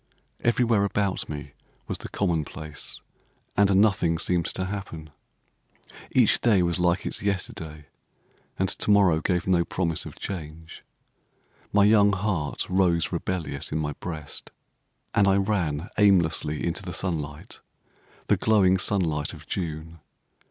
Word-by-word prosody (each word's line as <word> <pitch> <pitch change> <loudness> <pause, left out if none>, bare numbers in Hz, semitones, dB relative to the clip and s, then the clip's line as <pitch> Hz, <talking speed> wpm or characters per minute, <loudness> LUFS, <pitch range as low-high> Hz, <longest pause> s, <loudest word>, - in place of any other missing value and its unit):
Everywhere 115 -3 +2
about 100 -1 -1
me 75 -2 -7 0.3
was - - -4
the - - -7
commonplace; 80 -4 -3 0.5
and 100 -1 +4
nothing 95 -5 +3
seemed 90 0 +1
to 95 - -2
happen. 90 -6 -6 1.0
Each - - +3
day 105 -6 +4
was 85 +1 0
like 90 +2 +1
its - - -2
yesterday, 80 -6 -3 0.7
and 95 - +1
to 100 - -2
morrow 95 -6 +5
gave 90 +2 0
no 90 -2 +3
promise 85 -2 -2
of - - -10
change. 80 -3 -7 0.9
My 105 0 +4
young 105 -1 +5
heart 90 -6 -1
rose 90 -3 +2
rebellious 85 -7 -3
in 75 - -1
my 75 -1 -2
breast; 80 -1 -7 0.6
and 100 -1 +4
I 95 - +4
ran 95 -5 0
aimlessly 85 -6 +3
into 85 +3 -1
the 90 -3 -6
sunlight—the 75 -6 -5
glowing 95 -4 +3
sunlight 80 -7 0
of - - -12
June. 80 -1 -5
90 Hz, 130 wpm, -26 LUFS, 80-100 Hz, 1.0 s, morrow